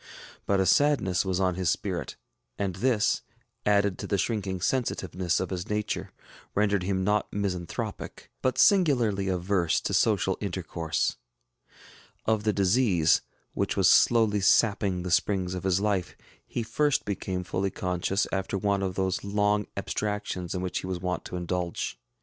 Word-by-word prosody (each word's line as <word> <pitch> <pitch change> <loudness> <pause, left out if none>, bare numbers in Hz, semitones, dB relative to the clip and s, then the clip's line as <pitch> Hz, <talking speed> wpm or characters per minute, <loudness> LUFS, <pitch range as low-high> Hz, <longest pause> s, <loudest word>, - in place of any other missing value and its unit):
But 100 -1 +2
a 95 - +3
sadness 95 -4 +3
was 95 -1 0
on 95 -1 +2
his 90 -2 0
spirit; - - -2 0.4
and 95 -3 -2
this, 115 -1 +2 0.5
added 100 -2 +2
to - - -5
the 100 - +1
shrinking 95 -3 -1
sensitiveness 90 -5 -1
of 95 - -3
his 90 +2 -4
nature, 105 0 -2 0.4
rendered 100 -1 +2
him 95 0 -1
not 105 +1 +1
misanthropic, 90 -4 -4
but 130 -1 0
singularly 120 - +3
averse 90 -2 +1
to - - -3
social - - +2
intercourse. 80 -2 -2 1.1
Of 110 -1 +1
the 105 - +4
disease, 95 -5 +3 0.3
which - - -1
was - - +5
slowly 110 -4 +4
sapping 100 -2 +3
the 90 - -4
springs 95 0 +1
of 90 0 -5
his 95 -1 +2
life, 100 -3 -1 0.3
he 120 - -3
first 145 +6 +1
became 95 -2 -3
fully 95 +3 -1
conscious 90 +2 -1
after 95 0 -1
one 100 0 0
of 95 -2 -2
those 95 -1 -1
long 105 0 +1
abstractions 105 -4 -3
in 90 - -2
which 90 - -2
he - - -6
was 90 -1 -3
wont 90 -1 -3
to - - -6
indulge. 90 -6 -3
95 Hz, 155 wpm, -27 LUFS, 90-105 Hz, 1.1 s, was